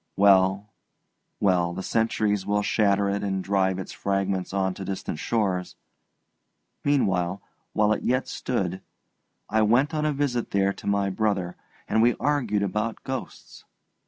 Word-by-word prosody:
Well, 100 +1 +4 0.7
well, 90 -3 +2
the 95 +2 -5
centuries 110 -3 +1
will 105 +1 0
shatter 100 -1 +2
it 100 +1 -1
and 95 -2 -2
drive 95 -1 +1
its 95 - -6
fragments 95 -1 -1
on 95 -1 0
to 95 - -7
distant 95 -5 -4
shores. 95 -5 -1 1.1
Meanwhile, 95 -10 +1 0.3
while 105 0 +3
it - - -3
yet 125 +1 0
stood, 95 -7 -2 0.7
I 110 0 +1
went 125 +9 +3
on 155 0 0
a - - +2
visit 135 -4 -1
there 100 0 +1
to - - -10
my 100 -1 +1
brother, 95 -3 -1 0.3
and 110 - +2
we 120 +1 +4
argued 135 -8 0
about 105 +3 -2
ghosts. 130 0 -7
100 Hz, 145 wpm, -25 LUFS, 95-110 Hz, 1.1 s, Well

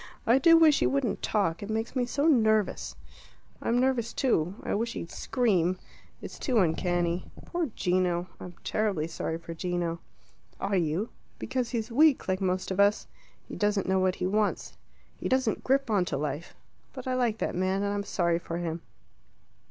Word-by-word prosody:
I 240 +4 +5
do 330 +2 +7
wish 315 -3 +5
you - - +3
wouldn't 270 -5 -1
talk; 180 -6 0
it 205 - -6
makes 225 +3 -2
me 250 -2 +1
so 280 +4 0
nervous." 220 - +2 0.7
"I'm 240 +1 +1
nervous 250 -3 +1
too. 190 - +1
I - - -2
wish 230 +3 -1
he'd 165 - -6
scream. 185 -8 +1 0.5
It's - - -8
too 255 -4 0
uncanny. 175 -1 +1 0.2
Poor 345 -2 -1
Gino! 180 -1 +1
I'm 180 -1 -9
terribly 205 -8 0
sorry 160 0 -3
for 165 0 -8
Gino." 170 0 -2 0.6
"Are 195 0 -1
you?" 175 +5 0 0.3
"Because 255 -2 -2
he's 230 -2 -3
weak 295 +3 +4
like 185 +1 0
most 185 0 -1
of 190 - -2
us. 200 +1 +4 0.4
He - - -7
doesn't 205 -2 0
know 190 0 +2
what 185 0 +2
he 180 - -3
wants. 210 +2 0 0.4
He - - -3
doesn't 260 -4 +1
grip 270 -2 +1
on 200 -4 +3
to 150 - -2
life. 145 +3 -4 0.4
But 260 -2 -8
I 255 - -1
like 240 -4 +1
that - - -2
man, 190 +2 0
and 200 0 0
I'm 205 - -1
sorry 170 -4 0
for 170 -1 -5
him." 170 -1 -3
200 Hz, 180 wpm, -28 LUFS, 175-240 Hz, 0.7 s, do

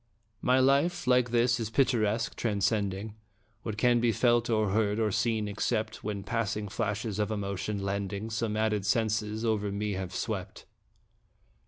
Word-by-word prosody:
My 130 +1 +3
life, 140 +7 +2
like 125 -1 +3
his, 120 +1 +2
is 110 -2 -2
picturesque, 115 -3 +1
transcending 100 -1 -1 0.5
What 110 -2 -5
can 120 +1 +4
be 115 0 +3
felt, 120 +2 +2
or 110 -3 +2
heard, 105 0 +1
or 110 -2 +1
seen, 110 0 0
except 110 +1 -2
When 100 -2 -3
passing 105 -1 -2
flashes 105 0 -2
of 105 - 0
emotion, 100 -1 -3
lending 100 +2 -3
Some 110 -1 -1
added 110 -2 +1
senses, 110 +1 0
over 105 -2 0
me 105 +1 -2
have 95 -1 -4
swept. 100 -4 -4
110 Hz, 150 wpm, -29 LUFS, 100-115 Hz, 0.5 s, can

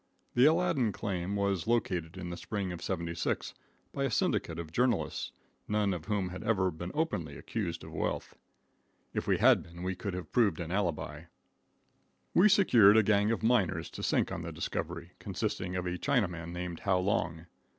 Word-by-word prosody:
The 125 +2 +5
Aladdin 155 -8 +3
claim 95 -1 -3
was 100 -3 0
located 90 -8 0
in 90 -2 -5
the - - -4
spring 100 +1 -3
of 85 - -6
'76 85 -3 -2 0.4
by - - 0
a - - +1
syndicate 80 - 0
of 85 -2 -6
journalists, 120 +3 0 0.4
none 105 -2 +1
of 85 -3 -5
whom 100 -2 -1
had 90 +1 -7
ever 95 -5 +2
been 85 +2 -6
openly 90 - -1
accused 85 -7 -4
of - - -9
wealth. - - -3 0.8
If - - -2
we - - +3
had - - +6
been, 85 +1 -10
we 95 +1 -1
could 95 0 -4
have 90 - -6
proved 105 -9 +3
an 85 -1 -4
alibi. 85 -5 -2 1.1
We 205 +4 +6
secured 120 - +6
a 110 - +6
gang 105 0 +3
of 115 -1 -1
miners 95 -8 +2
to - - -7
sink - - +1
on - - -3
the - - -5
discovery, - - -4
consisting 90 0 -3
of 90 -1 -2
a 90 0 -2
Chinaman 90 - 0
named 90 -1 -5
How 95 -2 +2
Long. 90 -4 -1
95 Hz, 180 wpm, -31 LUFS, 85-110 Hz, 1.1 s, had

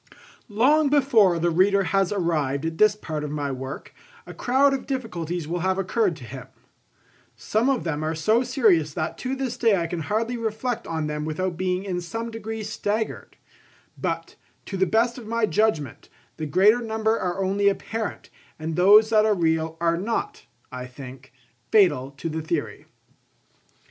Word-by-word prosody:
Long 280 +8 +3
before 240 -11 +4
the 170 +1 +1
reader 195 +4 +3
has 195 0 +1
arrived 160 -7 -1
at 165 0 -4
this 215 -1 +5
part 155 -7 -5
of 150 - -4
my 145 -1 -3
work, 130 +1 -7 0.3
a - - -9
crowd 275 +3 +2
of 270 - -4
difficulties 175 - -3
will 175 +2 -2
have 190 +2 0
occurred 195 -1 0
to 145 - -12
him. 125 +1 -9 0.9
Some 215 - 0
of 270 -3 +1
them 155 -2 -2
are 160 +1 -1
so 215 +9 +2
serious 210 - +2
that 155 - -2
to 260 +1 -2
this 260 -3 -3
day 225 -4 +3
I 170 -3 -1
can 170 +1 -4
hardly 220 +10 -1
reflect 230 +2 -3
on 160 -2 -2
them 150 0 -3
without 170 +4 -2
being 185 +1 -1
in 180 -3 -3
some 225 +6 -5
degree 220 0 -5
staggered; 215 +1 -3 0.6
but, - - -4 0.3
to 195 - -6
the 190 0 +2
best 235 +5 +1
of 225 - -11
my 230 0 +1
judgment, 210 - -1 0.3
the 155 - -4
greater 205 +9 +4
number 220 0 0
are 185 +1 -2
only 200 +1 +2
apparent, 220 +2 -4 0.3
and 160 0 -4
those 210 +5 +6
that 215 -1 +5
are 215 -1 +3
real 160 -2 0
are 170 0 +1
not, 325 - -3 0.2
I 125 0 -6
think, 130 0 -11 0.4
fatal 175 -11 +3
to 165 - -4
the 160 0 -3
theory. 155 - -4
190 Hz, 175 wpm, -24 LUFS, 160-225 Hz, 0.9 s, those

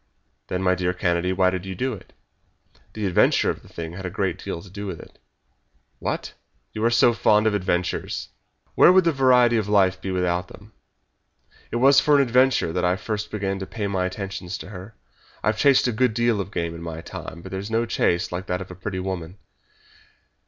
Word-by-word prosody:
"Then, 90 +1 -2
my 90 -1 +3
dear 90 0 -1
Kennedy, 90 0 0
why 95 0 +3
did 95 -1 -4
you 95 -1 -6
do 130 +7 -1
it?" 100 - -11 0.8
"The 105 -2 -3
adventure 95 - +3
of - - -8
the - - -18
thing 80 0 -7
had 95 +2 -8
a 90 - -3
great 95 -1 -2
deal 95 -4 -4
to 95 - -13
do 100 +1 -6
with 90 -4 -5
it." - - -15 0.8
"What! - - -3 0.4
You 110 - -4
are - - +5
so 120 0 +4
fond 105 -1 +3
of 110 - +2
adventures!" 90 -3 -2 0.4
"Where - - +7
would 185 0 +5
the 165 - +3
variety 125 -4 +4
of 105 -3 -1
life 100 -3 +3
be 95 - -4
without 90 -1 0
them? 105 +4 -15 1.0
It - - -5
was 135 +3 +6
for 150 - +3
an 140 - +5
adventure 125 -8 +2
that 90 0 -1
I 90 +1 +2
first 105 +1 -4
began 100 -2 -3
to 95 - -6
pay 105 -3 -4
my 95 -2 0
attentions 95 -2 -5
to - - -10
her. 100 +2 -10 0.5
I've 110 +1 0
chased 140 -3 +4
a - - +1
good 115 0 +1
deal 120 -3 +2
of 95 - -6
game 85 -4 -3
in 85 - -9
my 85 -1 -6
time, 85 +1 -9
but 95 - -9
there's 95 +2 -5
no 115 +1 +1
chase 90 -5 0
like 90 +2 -5
that 90 - -1
of 95 -1 -8
a - - -9
pretty 95 +1 -5
woman. 90 -1 -5
95 Hz, 215 wpm, -23 LUFS, 90-110 Hz, 1.0 s, Where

